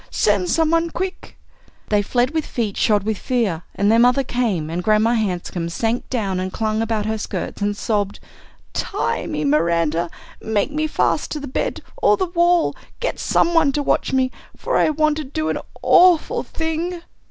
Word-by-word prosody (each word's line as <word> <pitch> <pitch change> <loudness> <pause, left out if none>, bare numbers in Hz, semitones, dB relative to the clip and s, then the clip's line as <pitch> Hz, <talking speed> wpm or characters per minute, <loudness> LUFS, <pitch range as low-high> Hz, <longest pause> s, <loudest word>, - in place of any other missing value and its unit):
Send 200 -4 +1
some 320 -1 +2
one 335 0 +2
quick!" 370 +3 -5 0.5
They 210 -1 +3
fled 245 +5 +1
with 315 -1 -1
feet 220 -8 -3
shod 210 -3 +2
with 215 -1 -2
fear, 225 -11 0
and 205 +1 +2
their 225 - +5
mother 250 +3 +4
came, 230 -11 -1
and 175 +2 -3
Grandma 215 +3 +3
Hanscom 180 -5 -2
sank 225 +7 -2
down 200 -7 -1
and 185 0 -3
clung 215 +1 -1
about 220 -2 -1
her 220 0 -2
skirts 205 - -5
and 205 0 0
sobbed: 205 -3 -1 0.5
"Tie - - -2
me, 150 0 -2
Miranda. 165 +2 +1 0.3
Make 220 +4 0
me 310 +1 -1
fast - - 0
to 305 - -3
the 285 - -6
bed 260 - -3 0.2
or 420 - +4
the 375 - 0
wall. 345 -1 +2 0.2
Get - - -2
some 345 - +2
one 320 -4 +4
to 290 - -1
watch - - +1
me. 260 -1 +1 0.3
For - - -2
I - - +4
want 310 0 +1
to 310 - -3
do 310 +3 -3
an - - -1 0.2
awful 355 -3 +5
thing!" 330 +2 -3
230 Hz, 185 wpm, -21 LUFS, 205-310 Hz, 0.5 s, their